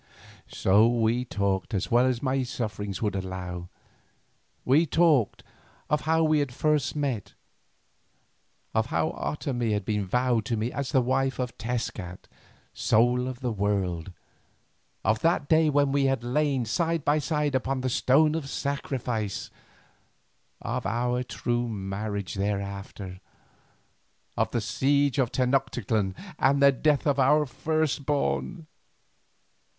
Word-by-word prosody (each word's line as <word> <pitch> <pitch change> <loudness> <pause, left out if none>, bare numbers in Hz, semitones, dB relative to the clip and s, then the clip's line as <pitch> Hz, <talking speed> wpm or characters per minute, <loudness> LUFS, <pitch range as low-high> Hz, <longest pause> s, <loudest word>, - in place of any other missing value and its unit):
So 105 +4 +4
we 120 +1 +1
talked 100 -2 -1
as 95 - -2
well 120 +2 +5
as 125 0 -1
my 135 0 +1
sufferings 105 -6 -4
would 105 -2 0
allow. 90 -2 -5 1.0
We 150 +6 +4
talked 155 - +2 0.5
of 150 - +2
how 160 0 +4
we 155 -2 +3
first 145 +2 0
had 150 - -4
met, 130 -8 -2 1.4
of 110 +1 +1
how 160 - 0
Otomie 120 -7 -2
had 105 - -2
been 105 -3 -1
vowed 125 +2 +1
to 115 +1 -1
me 110 +3 -1
as 140 -2 -3
the 130 - +4
wife 135 +2 0
of 125 -2 -3
Tezcat, 110 -6 -4 0.5
Soul 125 +3 +2
of 130 0 -6
the 125 -2 -1
World, 95 -4 -1 0.9
of 110 +2 +2
that 165 -3 +2
day 160 +1 +4
when 145 -1 +2
we 140 0 +2
had 135 -3 +1
lain 135 0 0
side 165 +5 -1
by 150 +1 +3
side 150 -1 -1
upon 130 0 -1
the 130 - -1
stone 150 +5 +3
of 155 -4 -3
sacrifice, 125 -8 -3 1.1
of - - -2
our 120 +3 0
true 120 -1 -2
marriage 100 -1 -4
thereafter, 100 -1 -4 1.2
of 110 0 +1
the 120 - -1
siege 140 +5 +1
of 125 -3 +1
Tenoctitlan 125 -6 0 0.2
and 140 +1 +3
the 140 0 +7
death 145 +2 +1
of 140 -2 +2
our 150 +3 +4
first 155 +2 -1
born. 155 +3 -1
125 Hz, 135 wpm, -27 LUFS, 105-140 Hz, 1.4 s, the